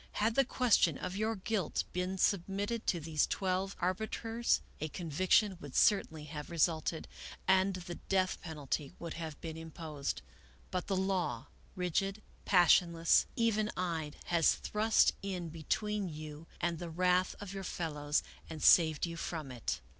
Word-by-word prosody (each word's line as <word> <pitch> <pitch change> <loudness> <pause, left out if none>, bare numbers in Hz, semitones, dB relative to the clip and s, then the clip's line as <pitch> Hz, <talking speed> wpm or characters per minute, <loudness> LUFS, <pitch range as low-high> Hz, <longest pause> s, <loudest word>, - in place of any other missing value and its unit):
" - - -27
Had 220 +2 +1
the 275 - +4
question 235 - +3
of 185 0 -4
your 220 +2 0
guilt 195 -3 -1
been 180 +1 -2
submitted 200 +5 0
to 175 - +2
these 155 -1 +1
twelve 190 +1 -1
arbiters, 220 +5 0 0.2
a 155 - -2
conviction 185 +5 +2
would 145 -2 -9
certainly 160 -7 +3
have 150 0 -7
resulted 165 -1 0 0.4
and 190 0 +4
the 175 -1 -6
death 185 +1 0
penalty 150 -2 -4
would 170 -1 -6
have 160 -3 -6
been 160 -1 -6
imposed. 160 -3 -5 0.5
But 180 -1 -2
the 195 - 0
law, 180 -10 -1 0.3
rigid, 195 +3 -1 0.2
passionless, 175 -3 +5
even 215 -2 +2
eyed, 165 -4 -2
has 170 -2 +3
thrust 215 +1 +3
in 185 -4 -4
between 200 +5 -2
you 155 0 -8
and 170 -2 -1
the 175 - -5
wrath 180 +2 +2
of 200 -1 -7
your 195 -1 -5
fellows 150 -5 -1 0.3
and 160 -2 -6
saved 160 -3 +6
you 170 -1 -5
from 155 -5 -4
it. 120 - -3
175 Hz, 150 wpm, -33 LUFS, 160-195 Hz, 0.5 s, saved